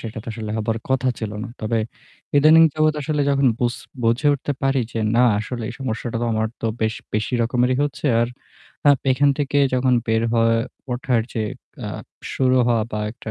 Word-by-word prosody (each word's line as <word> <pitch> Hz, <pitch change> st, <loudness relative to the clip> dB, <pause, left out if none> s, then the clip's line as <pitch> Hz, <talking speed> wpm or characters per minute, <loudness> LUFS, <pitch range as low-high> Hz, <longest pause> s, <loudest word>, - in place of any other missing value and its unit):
সেটা 110 Hz, 0 st, -6 dB
তো -, -, -8 dB
আসলে 110 Hz, -1 st, -6 dB
হবার 110 Hz, +1 st, -1 dB
কথা 130 Hz, -1 st, +2 dB
ছিল 110 Hz, -2 st, -4 dB
না। -, -, -6 dB
তবে 110 Hz, +1 st, 0 dB, 0.6 s
ইদানিং 155 Hz, +3 st, +7 dB
যাবত 155 Hz, 0 st, +2 dB
আসলে 150 Hz, 0 st, -1 dB
যখন 140 Hz, -1 st, +2 dB
বুঝ 120 Hz, 0 st, +1 dB, 0.3 s
বুঝে 115 Hz, +6 st, +2 dB
উঠতে 140 Hz, +1 st, -3 dB
পারি 135 Hz, -1 st, +2 dB
যে 115 Hz, -, -2 dB, 0.2 s
না 120 Hz, -, +5 dB, 0.2 s
আসলে 115 Hz, +2 st, -4 dB
এই -, -, -5 dB
সমস্যাটা 115 Hz, -2 st, -3 dB
তো 120 Hz, -, 0 dB
আমার 110 Hz, 0 st, +1 dB
তো -, -, -1 dB
বেশ 110 Hz, 0 st, +1 dB, 0.2 s
বেশি 110 Hz, +3 st, -1 dB
রকমেরই 125 Hz, +2 st, +1 dB
হচ্ছে। 145 Hz, +1 st, -2 dB
আর 120 Hz, -, +1 dB, 0.6 s
আপ 140 Hz, -, +4 dB
এখান 140 Hz, +2 st, +3 dB
থেকে 145 Hz, 0 st, 0 dB, 0.2 s
যখন 125 Hz, 0 st, +2 dB
বের 110 Hz, 0 st, +1 dB
হওয়া 115 Hz, -1 st, +3 dB, 0.4 s
ওঠার 125 Hz, -2 st, +1 dB
যে 110 Hz, -, 0 dB, 0.4 s
আ -, -, -4 dB, 0.5 s
শুরু 130 Hz, -1 st, +2 dB
হওয়া 115 Hz, -2 st, +2 dB
বা 105 Hz, -, -2 dB
একটা 115 Hz, -1 st, -8 dB
120 Hz, 190 wpm, -21 LUFS, 115-135 Hz, 0.6 s, ইদানিং